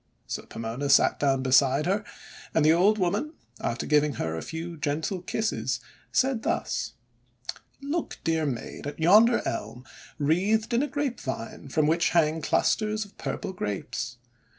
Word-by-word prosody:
So - - -5
Pomona 115 +5 -4
sat 135 - +5
down 135 -2 +2
beside 135 +2 +4
her, 200 +4 +1 0.5
and 160 - +4
the 155 - +7
old 195 +6 +4
woman, 210 - 0 0.3
after - - -2
giving 150 -1 +3
her 80 -8 -3
a 80 - -4
few 165 +1 -6
gentle 155 +5 -2
kisses, 220 +5 -1 0.3
said 260 -3 +2
thus: - - -1 0.4
— - - -10
;<Look, 310 +4 -2
dear 160 -2 +1
Maid, 130 +2 -5
at 145 - -6
yonder 215 +9 +6
Elm 125 +2 -4 0.3
wreathed 195 - +1
in 235 - +3
a 295 - 0
grapevine 235 - -4
from 155 +2 +2
which 165 +2 +3
hang 160 0 +3
clusters 215 +7 +1
of 205 - -19
purple 195 -2 -4
Grapes. 120 - -4
160 Hz, 150 wpm, -27 LUFS, 140-215 Hz, 0.5 s, the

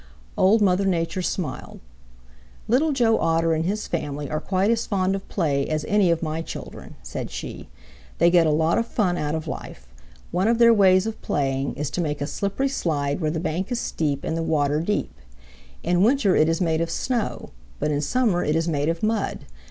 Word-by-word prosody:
Old 210 +3 +4
Mother 195 0 +2
Nature 175 0 0
smiled. 170 -6 -4 0.9
"Little 275 +8 +3
Joe 235 -5 +2
Otter 165 0 +2
and 160 +1 -1
his 210 +4 -2
family 145 -4 -4
are 155 - -1
quite 195 +5 +1
as 235 0 0
fond 190 -2 +1
of 195 0 -5
play 140 -7 0
as 155 -1 -2
any 205 -3 +3
of 170 0 +1
my 160 0 -2
children," - - -9
said - - -5
she. - - -7 0.5
"They 170 +1 +4
get 170 -2 +5
a - - +3
lot 160 +6 +2
of 230 - -2
fun 190 -7 0
out 150 -2 -2
of 160 0 -4
life. 60 - -7 0.5
One 185 +4 +1
of 230 0 +3
their 235 0 +7
ways 190 -2 +5
of 225 0 -5
playing 135 -1 -1
is 150 -1 -3
to 180 - -2
make 150 -3 -2
a 145 - -2
slippery 200 - -1
slide 145 - -1
where 155 - +1
the 160 +1 -2
bank 180 +5 -3
is 245 - 0
steep 145 - -2
and 160 - -2
the 165 - -1
water 150 -2 +1
deep. 205 +5 -2 0.7
In 175 +1 +2
winter 220 -3 +3
it 155 - +4
is 165 - 0
made 165 -2 +1
of 165 - -1
snow, 240 +5 -2 0.3
but 150 - -1
in 145 0 0
summer 215 - +1
it 150 - 0
is 165 +1 0
made 150 -2 0
of 165 +3 -3
mud. 215 -1 -1
170 Hz, 205 wpm, -24 LUFS, 155-200 Hz, 0.9 s, their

